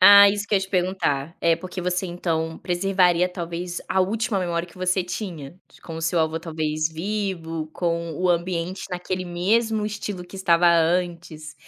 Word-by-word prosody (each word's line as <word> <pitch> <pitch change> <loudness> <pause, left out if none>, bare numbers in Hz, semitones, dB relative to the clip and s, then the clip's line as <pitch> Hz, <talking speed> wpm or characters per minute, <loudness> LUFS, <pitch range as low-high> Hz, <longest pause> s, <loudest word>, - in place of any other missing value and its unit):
Ah, 200 +2 +10
isso 205 0 -1
que 205 - 0
eu 195 - +4
te 190 - -5
perguntar. 175 -5 0
É, 165 -1 +3
porque 185 0 -6
você 180 +1 -1
então 165 -2 -2
preservaria, 180 -1 +2
talvez, 175 0 -5
a 190 - +2
última 215 +2 0
memória 175 -1 -2
que - - -18
você 185 +1 +1
tinha, 175 -5 -6 0.2
com 165 - -7
o 165 - -6
seu 165 +1 +1
avô, 160 0 0
talvez, 155 -2 -1
vivo, 165 -3 -3
com 170 -1 -1
o 180 +4 0
ambiente 175 +1 -1
naquele 185 +1 -3
mesmo 210 +5 +1
estilo 210 -3 -5
que 180 - -11
estava 175 -2 +4
antes. 170 -2 0
175 Hz, 170 wpm, -24 LUFS, 165-190 Hz, 0.2 s, Ah